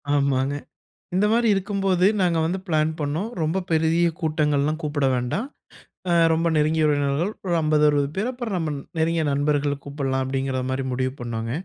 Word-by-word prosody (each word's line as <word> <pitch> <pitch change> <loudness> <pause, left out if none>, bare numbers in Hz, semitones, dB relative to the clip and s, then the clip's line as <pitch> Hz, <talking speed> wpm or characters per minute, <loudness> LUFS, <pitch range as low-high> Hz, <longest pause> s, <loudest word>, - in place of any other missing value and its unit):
ஆமாங்க. 140 -1 +1 0.6
இந்த 195 +3 +3
மாதிரி 235 +1 +3
இருக்கும்போது 195 -2 +1 0.2
நாங்க 175 -2 +2
வந்து 180 +4 -1
பிளான் 155 -2 +1
பண்ணோம் 155 +8 -2
ரொம்ப 160 +4 0
பெரிய 165 +2 +3
கூட்டங்கள்லாம் 155 -1 +1
கூப்பட 145 -2 0
வேண்டாம். 125 - -2 0.6
அ, - - +3 0.2
ரொம்ப 165 +1 +1
நெருங்கிய 155 +1 +2
உறவினர்கள் 145 +5 +1
ஒரு 175 - 0
50 155 -1 +2
60 145 -1 +1
பேர், 210 +6 -1
அப்பறம் 240 -5 -4
நம்ம 160 -3 -2 0.3
நெருங்கிய 165 0 +1
நண்பர்கள 145 0 +1
கூப்பலாம் 135 -2 -2
அப்டிங்கிற 135 0 -2
மாரி 130 +1 -1
முடிவு 130 +1 -1
பண்ணோங்க. 115 -1 -4
155 Hz, 155 wpm, -23 LUFS, 140-170 Hz, 0.6 s, இந்த